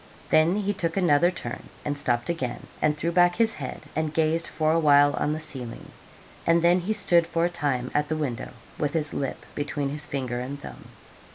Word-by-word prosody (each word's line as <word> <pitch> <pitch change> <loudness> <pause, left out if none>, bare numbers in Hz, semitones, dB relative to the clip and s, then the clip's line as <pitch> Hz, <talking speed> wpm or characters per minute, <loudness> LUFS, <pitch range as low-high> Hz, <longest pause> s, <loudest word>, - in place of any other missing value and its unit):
Then 160 +4 +4
he 205 0 0
took 170 -2 -2
another 175 -2 +4
turn, 125 -9 -7 0.2
and 145 - -1
stopped 120 -4 0
again, 135 -8 -3 0.2
and 150 0 +2
threw 165 +3 -1
back 175 0 +4
his 225 -1 +2
head, 135 -4 -6
and 155 0 -1
gazed 160 +1 +1
for 155 0 0
a 165 - +3
while 145 -2 +5
on 150 - 0
the 155 - -2
ceiling, 125 -6 -3 0.6
and 165 0 +4
then 175 +1 +5
he 180 +5 -3
stood 170 -5 +3
for 165 0 +1
a - - +1
time 135 -6 -1
at 150 0 +1
the 155 - -1
window, 135 -6 -3 0.3
with 145 +1 -1
his 150 -2 -1
lip 135 - -4
between 145 -1 -2
his 150 +1 -6
finger 125 -3 -3
and 135 +3 -5
thumb. - - -10
155 Hz, 205 wpm, -26 LUFS, 145-170 Hz, 0.6 s, while